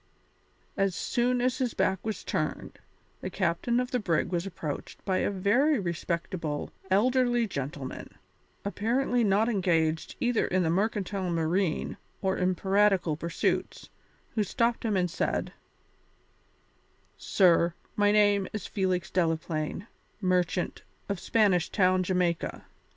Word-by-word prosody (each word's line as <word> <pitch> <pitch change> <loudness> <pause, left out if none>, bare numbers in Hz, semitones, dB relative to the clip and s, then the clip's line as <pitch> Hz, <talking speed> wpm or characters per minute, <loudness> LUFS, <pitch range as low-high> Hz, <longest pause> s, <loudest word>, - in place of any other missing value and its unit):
As 195 -2 +1
soon 245 +3 0
as 255 +2 0
his 250 -3 -1
back 190 0 +1
was 220 -1 -4
turned, - - -3 0.4
the - - -4
captain 235 +9 0
of 250 0 -2
the 250 - +1
brig 170 -5 0
was 175 +1 -1
approached 155 -6 -6
by 190 -2 +1
a - - +1
very 220 +10 +2
respectable 170 -3 -3 0.2
elderly 240 +4 +3
gentleman, 140 -6 -5 0.6
apparently 240 +4 +1
not 210 +2 +3
engaged 165 -7 +1
either 245 -2 +1
in 185 0 +1
the 165 - +1
mercantile 195 -1 -1
marine 170 +1 0 0.2
or 190 -1 0
in 185 0 +1
piratical 195 -3 +2
pursuits, 170 +2 -2 0.4
who 215 - +1
stopped 230 +4 0
him 215 -4 +1
and 180 -2 0
said: 185 - -1 1.6
"Sir, 170 -3 +3 0.2
my 205 0 +4
name 205 -2 +4
is 210 -4 -4
Felix 185 -3 -1
Delaplaine, 165 0 -1 0.3
merchant, 180 -2 0 0.3
of 200 -2 -2
Spanish 195 -6 +2
Town, 185 -2 +3
Jamaica. 180 -2 -1
190 Hz, 125 wpm, -28 LUFS, 170-215 Hz, 1.6 s, my